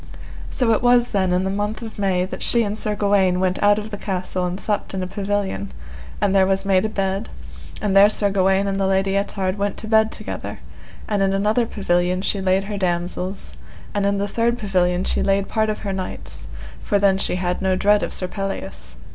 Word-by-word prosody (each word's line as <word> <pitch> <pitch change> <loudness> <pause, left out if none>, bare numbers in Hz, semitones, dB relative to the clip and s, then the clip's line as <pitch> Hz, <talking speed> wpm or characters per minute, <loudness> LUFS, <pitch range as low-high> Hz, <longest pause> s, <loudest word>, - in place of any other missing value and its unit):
So 245 -3 +1
it 220 - +2
was 245 0 +4
then 190 -3 +1
in 180 +1 +2
the 190 - -1
month 205 +3 -2
of 220 -2 -8
May 185 -2 +1
that 185 - -7
she 235 -1 +3
and 205 -1 -2
Sir 215 -1 0
Gawaine 195 -3 +2
went 185 0 0
out 205 0 +5
of 215 +1 -5
the 205 - -5
castle 185 -1 -2
and 180 +2 -4
supped 205 -2 -2
in 185 - -2
a - - -2
pavilion, 195 - -2 0.5
and 195 - +1
there 190 -1 +4
was 195 0 0
made 195 0 +3
a - - 0
bed, 195 +1 -2 0.5
and 200 -2 0
there 200 +1 +8
Sir 205 -1 +1
Gawaine 195 0 +2
and 195 0 -1
the 195 - +1
Lady 195 0 +1
Ettard 200 -1 -1
went 200 0 -1
to 220 - -7
bed 220 0 +4
together, - - -5 0.5
and 205 -2 0
in 195 0 +2
another 215 +4 +1
pavilion 180 -2 0
she 200 - 0
laid 190 +1 +2
her 205 0 -4
damosels, 180 +1 -2 0.4
and 205 - 0
in 200 0 +1
the 200 +1 -1
third 235 +3 0
pavilion 180 -4 +1
she - - 0
laid 195 0 +1
part 220 -1 0
of 215 - -3
her 200 -2 -3
knights, 185 -1 -6 0.3
for 205 - +1
then 195 -1 +3
she - - +1
had 180 0 -2
no 190 -1 +2
dread 205 +2 +3
of - - -3
Sir 185 - -2
Pelleas. 95 - -5
195 Hz, 220 wpm, -21 LUFS, 185-205 Hz, 0.5 s, there